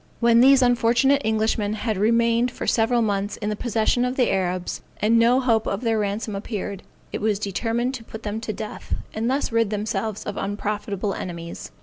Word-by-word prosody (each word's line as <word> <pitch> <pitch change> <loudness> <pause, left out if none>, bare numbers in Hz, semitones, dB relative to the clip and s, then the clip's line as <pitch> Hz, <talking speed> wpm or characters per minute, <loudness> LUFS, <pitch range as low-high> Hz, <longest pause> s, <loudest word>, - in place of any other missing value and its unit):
When 235 -1 +5
these 270 0 +6
unfortunate 245 +3 +3
Englishmen 220 -1 0
had 220 0 -2
remained 230 +3 +2
for - - -6
several 235 +1 +2
months 205 -1 -1
in 210 - -3
the - - -1
possession 230 +2 +1
of 250 +1 -1
the 250 -3 +2
Arabs, 185 -1 -2 0.2
and 225 +2 +3
no 240 +3 +4
hope 230 -4 +1
of 195 +2 -2
their 225 -3 +1
ransom 205 +1 -2
appeared, 200 -1 -4 0.3
it - - -4
was 215 -1 +1
determined 225 +5 -1
to 245 -4 -6
put 220 0 -10
them 215 +1 -3
to 225 - -3
death, 215 +1 -5 0.2
and 225 +2 -1
thus 270 0 0
rid 230 -2 +2
themselves 215 0 -2
of 205 - -5
unprofitable 205 0 -2
enemies. 170 -2 -6
220 Hz, 190 wpm, -23 LUFS, 205-235 Hz, 0.3 s, these